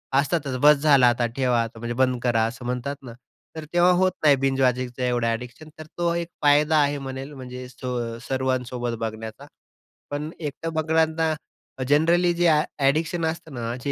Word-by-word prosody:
असतातच, 140 Hz, -1 st, +1 dB
"बस 150 Hz, +1 st, +7 dB
झाला 140 Hz, -3 st, +5 dB
आता 120 Hz, 0 st, 0 dB
ठेवा, 125 Hz, -3 st, +2 dB
आता 115 Hz, 0 st, -8 dB
म्हणजे 120 Hz, +1 st, -4 dB
बंद 130 Hz, -1 st, +2 dB
करा," 115 Hz, -2 st, +2 dB
असं 120 Hz, +1 st, -8 dB
म्हणतात 125 Hz, +3 st, -3 dB
ना. 120 Hz, -, -9 dB, 0.4 s
तर 160 Hz, -, -6 dB
तेव्हा 175 Hz, +1 st, +5 dB
होत 185 Hz, 0 st, +3 dB
नाही 145 Hz, -2 st, +6 dB
बिंज 135 Hz, 0 st, +1 dB
वॉचिंगचं 125 Hz, 0 st, 0 dB
एवढं 120 Hz, -1 st, +1 dB
ॲडिक्शन. 120 Hz, +6 st, -5 dB
तो 170 Hz, +2 st, -2 dB
एक 170 Hz, -1 st, -2 dB
फायदा 150 Hz, +2 st, +4 dB
आहे 145 Hz, 0 st, +1 dB
म्हणेल, 135 Hz, +2 st, -6 dB
म्हणजे 125 Hz, -2 st, -8 dB
सो 120 Hz, -2 st, -4 dB
सर्वांसोबत 125 Hz, -3 st, -2 dB
बघण्याचा. 110 Hz, 0 st, -6 dB, 0.7 s
पण 150 Hz, +2 st, -3 dB
एकटं 160 Hz, +1 st, -5 dB
बघणाऱ्यांना 160 Hz, 0 st, +1 dB, 0.5 s
अ, 130 Hz, -, -1 dB
जनरली 170 Hz, +4 st, +3 dB
जे 175 Hz, 0 st, +3 dB
अ, 155 Hz, -1 st, +4 dB, 0.2 s
ॲडिक्शन 160 Hz, +4 st, +1 dB
असतं 160 Hz, -1 st, -4 dB
ना, 120 Hz, -1 st, -4 dB
जे 140 Hz, -, 0 dB
135 Hz, 175 wpm, -24 LUFS, 125-155 Hz, 0.7 s, बस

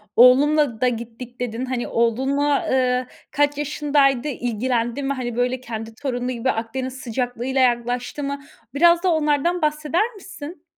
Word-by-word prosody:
"Oğlumla 265 Hz, 0 st, +5 dB
da 255 Hz, -, +4 dB
gittik." 235 Hz, +1 st, -5 dB
dedin. 245 Hz, 0 st, -3 dB
Hani, 255 Hz, -2 st, -3 dB
oğlunla, 270 Hz, +5 st, +1 dB
eee, 255 Hz, -1 st, +1 dB, 0.2 s
kaç 290 Hz, -1 st, +1 dB
yaşındaydı? 290 Hz, -2 st, +1 dB
İlgilendi 240 Hz, 0 st, -1 dB
mi? 275 Hz, +1 st, 0 dB
Hani 245 Hz, -3 st, -4 dB
böyle 250 Hz, +1 st, 0 dB
kendi 225 Hz, -2 st, -7 dB
torunu 250 Hz, -1 st, -3 dB
gibi 255 Hz, +1 st, 0 dB
Akdeniz 255 Hz, +3 st, -4 dB
sıcaklığıyla 250 Hz, +2 st, -1 dB
yaklaştı 245 Hz, +3 st, 0 dB
mı? 280 Hz, 0 st, -3 dB, 0.3 s
Biraz 340 Hz, +4 st, +5 dB
da 370 Hz, -, +3 dB
onlardan 310 Hz, +3 st, +1 dB
bahseder 305 Hz, +9 st, 0 dB
misin? 345 Hz, -4 st, -10 dB
260 Hz, 140 wpm, -22 LUFS, 245-290 Hz, 0.3 s, Oğlumla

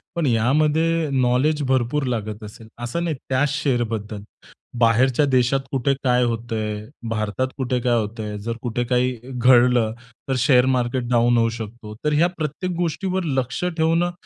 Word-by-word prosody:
पण 170 Hz, -3 st, 0 dB
यामध्ये 155 Hz, +7 st, +2 dB
नॉलेज 130 Hz, +4 st, +2 dB
भरपूर 130 Hz, +3 st, +1 dB
लागत 110 Hz, -1 st, -5 dB
असेल. 110 Hz, +1 st, -11 dB, 0.2 s
असं 170 Hz, +9 st, -2 dB
नाही 165 Hz, -3 st, -1 dB
त्या 130 Hz, +2 st, +2 dB
शेअर 135 Hz, -3 st, 0 dB
बद्दल. 105 Hz, -1 st, -5 dB, 0.6 s
बाहेरच्या 125 Hz, +5 st, +3 dB
देशात 130 Hz, 0 st, +2 dB
कुठे 135 Hz, +1 st, +1 dB
काय 125 Hz, -1 st, +3 dB
होत 115 Hz, 0 st, -2 dB
आहे. 105 Hz, -1 st, -3 dB, 0.2 s
भारतात 110 Hz, +3 st, -1 dB
कुठे, 130 Hz, -1 st, -1 dB
कुठे -, -, 0 dB
काय 120 Hz, -1 st, +2 dB
होत 110 Hz, +2 st, -5 dB
आहे. 105 Hz, -1 st, -4 dB
जर 115 Hz, +2 st, -4 dB
कुठे 120 Hz, 0 st, -2 dB
काही 125 Hz, +1 st, +1 dB, 0.2 s
घडलं, 125 Hz, -2 st, +4 dB, 0.4 s
तर 135 Hz, -, +1 dB
शेअर 125 Hz, -1 st, +4 dB
मार्केट 125 Hz, +1 st, -1 dB
डाउन 120 Hz, 0 st, +3 dB
होऊ 115 Hz, 0 st, +3 dB
शकतो. 110 Hz, -1 st, -8 dB
तर 150 Hz, -, +2 dB
या 165 Hz, +4 st, +4 dB
प्रत्येक 170 Hz, +4 st, -3 dB
गोष्टीवर 180 Hz, +2 st, -1 dB
लक्ष 130 Hz, -1 st, -2 dB
ठेवणं 165 Hz, +1 st, +1 dB
125 Hz, 165 wpm, -22 LUFS, 115-150 Hz, 0.6 s, घडलं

